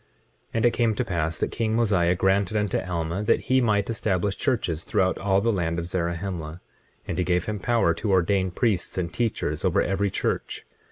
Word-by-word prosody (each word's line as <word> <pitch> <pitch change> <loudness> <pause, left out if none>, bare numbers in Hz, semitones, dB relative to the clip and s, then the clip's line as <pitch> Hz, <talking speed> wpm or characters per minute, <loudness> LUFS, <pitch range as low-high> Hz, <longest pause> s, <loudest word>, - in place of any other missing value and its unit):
25:19 - - -39 0.5
And 115 - +2
it 120 - +5
came 115 -2 +1
to - - -1
pass 80 -3 -2
that - - -2
king 110 -1 -1
Mosiah 95 -7 +2
granted 95 +3 +1
unto 105 -2 0
Alma 85 0 -3
that 105 +2 +2
he 130 0 +2
might 105 -4 +2
establish 100 -4 -1
churches 90 - -1
throughout 95 0 +1
all 95 0 +2
the 115 - +2
land 85 -5 -1
of 85 - -2
Zarahemla; 85 -1 -3 0.5
and 90 - -1
gave 90 -1 +1
him 105 -1 -3
power 115 -5 +2
to 105 +6 -4
ordain 95 +1 +2
priests 95 -1 -1
and 90 -1 -2
teachers 115 -2 -1
over - - +2
every 100 +2 +1
church. - - -3
95 Hz, 190 wpm, -25 LUFS, 85-110 Hz, 0.5 s, it